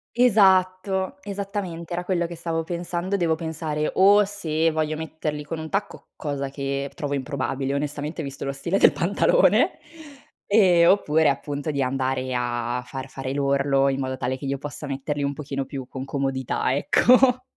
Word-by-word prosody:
Esatto, 190 -4 +3
esattamente 195 -4 -5
era 175 +1 -2
quello 175 -2 0
che 170 - -8
stavo 165 0 -2
pensando; 175 +3 -3
devo 170 -3 +1
pensare 160 -1 -3
o 200 +2 +6
se 165 -5 0
voglio 155 -1 -1
metterli 155 -1 -4
con 165 +2 -5
un 160 0 -6
tacco, 200 +3 -4
cosa 140 -2 -3
che 140 0 -3
trovo 145 -1 -3
improbabile 135 -1 -2
onestamente 145 +3 -3
visto 140 -2 -6
lo 140 - -1
stile 170 +8 -1
del - - +6
pantalone, 205 - +3 0.7
e 185 -5 +5
oppure, 160 -5 +4
appunto 145 +3 -3
di 140 -2 -1
andare 130 0 -1
a 120 0 -1
a 125 - -5
far 130 +1 -7
fare 135 0 -5
l'orlo, 140 0 +2
in 135 0 -1
modo 130 -1 -2
tale 130 0 -2
che 140 - -8
io 135 0 -2
possa 145 +1 -6
metterli 140 +1 -3
un 140 0 -1
pochino 140 -1 -4
più 130 -2 -7
con 130 0 -6
comodità, 135 -2 -1
ecco. 250 - +4
150 Hz, 165 wpm, -24 LUFS, 135-175 Hz, 0.7 s, o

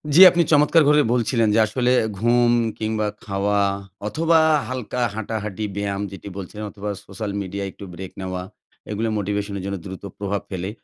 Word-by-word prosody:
জি, - - +7
আপনি 170 -1 +3
চমৎকার 150 +2 +5
করে 150 0 +6
বলছিলেন 115 -1 +2
যে - - +5
আসলে 125 +3 +1 0.3
ঘুম 120 +2 +4 0.3
কিংবা 110 -1 -1 0.2
খাওয়া 100 0 0 0.5
অথবা 160 +8 +3 0.3
হালকা 125 -1 -3
হাঁটাহাঁটি 110 -1 -3
ব্যায়াম 100 -1 -2
যেটি 100 +1 -9
বলছেন 100 +2 -7
অথবা 105 0 -6 0.2
সোশ্যাল 100 +1 -5
মিডিয়ায় 100 +1 -4
একটু 100 - -11
ব্রেক 95 +2 -7
নেওয়া, 95 -1 -3 0.5
এগুলো 110 +2 -1
মোটিভেশনের 100 -1 -2
জন্য 100 0 -3
দ্রুত 95 0 -8 0.2
প্রভাব 100 0 -2
ফেলে। 95 0 -4
105 Hz, 155 wpm, -22 LUFS, 100-120 Hz, 0.5 s, জি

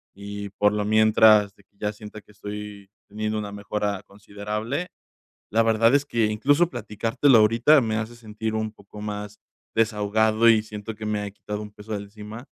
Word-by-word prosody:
y 100 +1 -7
por 105 +1 +2
lo 105 -1 -1
mientras, 110 -1 +5
de - - -23
que - - -44
ya 105 0 -2
sienta 105 0 -11
que 105 - -22
estoy 105 -1 -8 0.2
teniendo 110 +1 -3
una 105 -1 -5
mejora 100 -1 -3
considerable. 105 - -5 0.6
La 115 +2 +3
verdad 115 +2 +4
es 140 0 +3
que 115 -5 +1
incluso 145 +10 +2
platicártelo 115 +2 +2
ahorita 115 +8 +5
me 110 -2 -1
hace 110 +2 -4
sentir 110 -1 -5
un 110 0 -1
poco 105 -1 -13
más 105 0 -6 0.4
desahogado 110 +1 +2
y 110 -2 +5
siento 105 0 -7
que 110 0 -7
me 105 -1 -1
ha 100 - -5
quitado 105 +1 -6
un 105 - -9
peso 105 +1 -10
de 105 - -1
encima. 105 +3 -10
105 Hz, 180 wpm, -24 LUFS, 105-110 Hz, 0.6 s, mientras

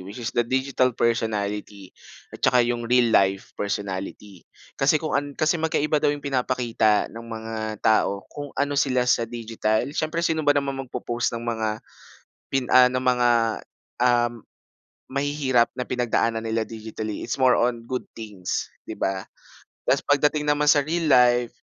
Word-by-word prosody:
which 95 +3 -10
is 120 0 -4
the 120 - +2
digital 130 +2 +1
personality 105 -4 -2 0.4
at - - -10
saka 125 0 +4
yung 120 -1 -2
real 120 -2 +3
life 95 0 +2
personality 100 -1 -5 0.3
kasi 140 +3 +4
kung 155 +1 -3
an 145 +1 +1
kasi 155 +1 +1
magkaiba 155 -1 +1
daw - - +2
yung 145 0 -2
pinapakita 125 -5 +1
ng 115 - -8
mga 110 -1 -5
tao 100 -2 +2
kung 145 0 -6
ano 140 +1 0
sila 135 -3 +1
sa 120 -2 +1
digital. 115 -2 -1
Siyempre 155 +2 -1
sino 160 -1 +1
ba 145 -1 +3
naman 140 -1 -1
magpo-post 120 -2 -3
ng 115 - -6
mga 110 -2 -1 0.8
pin 135 -1 0
ah, 125 0 +8
ng 130 0 -2
mga, 125 -1 +3 0.7
um, 120 -1 +2 0.7
mahihirap 140 -3 +1
na 125 - -2
pinagdaanan 115 -2 0
nila 115 0 -1
digitally, 110 -1 -6
it's 120 - -4
more 130 -1 +5
on 120 -1 0
good 125 0 -3 0.2
things, 105 -5 -5
di - - -8
ba? 95 0 -1 0.6
Tas - - +2
pagdating 150 +1 +1
naman 145 0 +2
sa 145 0 +6
real 165 +4 -2
life, 125 -3 +4
120 Hz, 160 wpm, -24 LUFS, 110-140 Hz, 0.8 s, ah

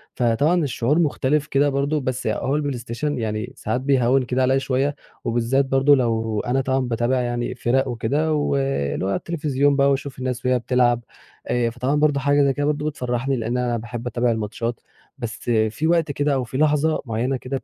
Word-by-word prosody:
فطبعًا 140 +9 +2
الشعور 140 +3 +1
مُختلف 150 -1 +1
كده 145 0 +2
برضه 140 +2 0
بس 130 -1 -3
ي - - +1
أهو 140 - -1
البلايستيشن 140 0 -2
يعني 110 +1 -3
ساعات 110 +4 -2
بيهوّن 130 -1 +3
كده 125 +1 -1
عليَّ 130 +1 +3
شوية، 135 +2 0 0.3
وبالذّات 120 +4 +1
برضه 135 +2 +4
لو 115 -4 0
أنا 130 +3 0
طبعًا 130 0 0
باتابع 125 0 0
يعني 120 0 -2
فِرَق 130 +3 +1
وكده، 140 +7 0
واللي 135 - 0
هو - - -1
على 100 - +1
التلفزيون 145 -4 0
بقى 140 0 +4
واشوف 140 -1 -3
الناس 125 -1 -3
وهي 125 0 +3
بتلعب، 120 -1 +2 0.4
آآ 120 -1 +1
فطبعًا 125 +4 -1
برضه 150 -1 +2
حاجة 145 +1 +3
زي 140 - +2
كده 145 +2 -1
برضه 150 0 -1
بتفرّحني، 130 -1 -2
لإن 120 0 -2
أنا 120 -1 0
باحب 120 +1 -6
اتابع 120 0 +1
الماتشات، 110 +2 -3 0.4
بس 115 -5 -5 0.3
في 155 +9 -2
وقت 165 -3 +2
كده 145 +1 0
أو 130 -2 0
في 125 +2 -5
لحظة 155 +1 +2
معيّنة 120 +4 -1
كده 130 +2 -5
130 Hz, 185 wpm, -22 LUFS, 120-140 Hz, 0.4 s, برضه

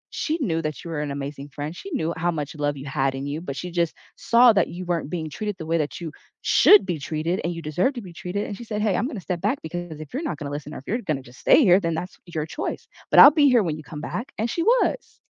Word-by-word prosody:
she 320 +2 -1
knew 165 -10 0
that 155 -1 -4
you 170 - -7
were 150 -2 -2
an 150 - -3
amazing 140 0 -6
friend, 145 +4 -6
she 395 - -8
knew 165 - -1
how 170 +2 0
much 150 -3 -4
love 145 -1 -1
you 135 - -8
had 135 -1 0
in 135 +1 -4
you, 145 +3 -4
but 140 -6 -5
she 180 +4 -5
just 170 -1 0 0.2
saw 235 0 +5
that 195 -4 +3
you 180 +1 -7
weren't 170 -4 -2
being 165 -3 -3
treated 210 +7 -4
the 160 - -7
way 165 +1 +1
that 150 +2 -3
you 160 -3 -5 0.3
should 415 - +6
be 175 -5 -2
treated 160 +5 -2
and 170 - -1
you 165 - -6
deserve 175 - +1
to 240 - -5
be 180 -3 -10
treated, 180 +4 -4
and 205 - -5
she - - -8
said, 215 -2 -4
"Hey, 210 -3 +2
I'm 245 - 0
gonna 240 -8 -5
step 175 -1 -4
back 225 +8 0
because 165 -1 -6
if 155 - -10
you're 275 - -2
not 170 - -3
gonna 145 -1 -6
listen 150 +1 -6
or - - -6
if - - -15
you're 230 +4 0
gonna 150 - -2
just 125 0 -16
stay - - +6
here, 185 -3 +6
then 165 -4 -1
that's 180 +3 -5
your 160 -3 -3
choice. 160 - -5 0.2
But - - +7
I'll 285 - +11
be 290 -2 +4
here 240 -4 +4
when 160 -4 -1
you - - -8
come 150 0 -8
back," 235 - -5
and 225 +2 0
she 335 - -2
was. - - +1
170 Hz, 295 wpm, -24 LUFS, 150-205 Hz, 0.3 s, I'll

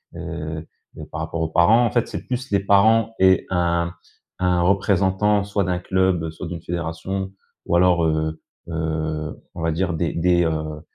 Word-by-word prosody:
heu 80 +1 -6 0.3
et - - -7
par - - -7
rapport 85 - -4
aux 80 - -1
parents, 110 +10 +5
en 115 - 0
fait, 120 - +1
c'est - - -6
plus 125 -2 -4
les 100 - +3
parents 110 +3 +4
et 95 -1 +4
un 85 -1 0 0.5
un 90 -1 +2
représentant, 100 +1 +2
soit 100 0 0
d'un 90 0 -1
club, 95 -3 0
soit 80 +2 -7
d'une 85 0 -6
fédération 85 +3 -4 0.3
ou 85 - +2
alors, 90 -2 +4
heu, 80 0 -1 0.3
heu, 80 -2 -3
on 85 - -6
va 80 0 +1
dire 90 +2 -1
des 80 +1 -1
des, 85 +1 +2
heu, 80 -1 -2
85 Hz, 175 wpm, -22 LUFS, 80-95 Hz, 0.5 s, parents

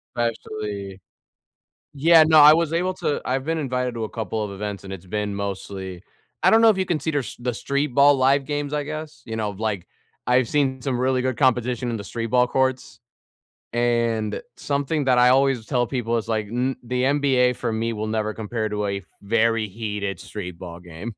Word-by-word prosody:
Especially 105 -4 -4 0.9
Yeah, 160 +3 +6
no, 155 0 +6
I 150 +1 +10
was 165 -1 +1
able 180 +2 0
to 145 - -2
I've 130 +2 -1
been 165 0 -1
invited 125 -4 -2
to 115 - -3
a 110 - -4
couple 110 -1 -3
of 100 - -5
events, 100 -1 -5
and 95 0 -7
it's 95 -1 -9
been 105 +2 -3
mostly 95 -2 -5 0.4
I - - +6
don't 225 - +5
know 225 - +7
if 200 - +3
you 190 - 0
can 165 -4 -1
see 160 +3 -2 0.3
the 120 0 -2
street 140 +5 -1
ball 140 0 +6
live 135 +1 +3
games, 145 0 -3
I 150 - 0
guess, 150 -4 -7
you 110 -1 -5
know, 110 -2 -1
like, 100 -3 -3 0.4
I've 125 -1 +3
seen 130 -1 0
some 130 -2 -1
really 130 0 +1
good 130 -2 -1
competition 125 -2 +1
in 115 - -2
the 100 - -7
street 115 +3 -4
ball 125 +2 +3
courts. 130 0 -1 0.7
And 115 -3 0 0.2
something 140 +1 -1
that 125 -2 +3
I 125 0 +6
always 130 -3 +3
tell 125 -4 0
people 120 -3 -1
is 115 - -4
like, 110 -2 -1
mm 125 +4 -1
the 125 +1 -1
NBA 135 -3 +3
for 120 -1 -3
me 115 +1 -1
will 110 0 -3
never 110 0 -1
compare 110 0 -3
to 105 0 -2
a 100 0 -2 0.2
very 115 +1 +1
heated 105 -3 -4
street 90 -5 -7
ball 85 -2 -8
game. 90 +6 -8
120 Hz, 200 wpm, -23 LUFS, 105-135 Hz, 0.9 s, I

